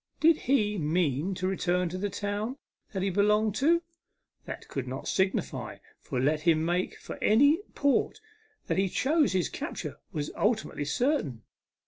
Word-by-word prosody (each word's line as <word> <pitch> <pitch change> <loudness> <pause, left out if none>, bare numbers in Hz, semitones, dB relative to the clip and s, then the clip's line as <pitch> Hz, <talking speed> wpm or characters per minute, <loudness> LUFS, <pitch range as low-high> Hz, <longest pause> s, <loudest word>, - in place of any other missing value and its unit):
Did 325 +1 +6
he 210 -8 +1
mean 160 +2 0
to 185 +1 -2
return 180 -1 +1
to 180 - -5
the 205 +1 -1
town 205 +6 -3 0.3
that 190 -2 -2
he 195 - +1
belonged 210 +2 +3
to? 335 +5 +3 0.6
That - - -7
could 135 -2 -4
not 130 +2 -5
signify, 190 0 -1 0.2
for 125 - -4
let 150 +4 +2
him 160 -1 +3
make 175 +2 -1
for - - -8
any 285 - +5 0.2
port 285 +7 +1 0.5
that - - 0
he 195 -1 +2
chose 290 - +2
his 180 -7 +1
capture - - -5
was 150 -1 -3
ultimately 215 -8 0
certain. 150 - 0
190 Hz, 155 wpm, -29 LUFS, 165-225 Hz, 0.6 s, Did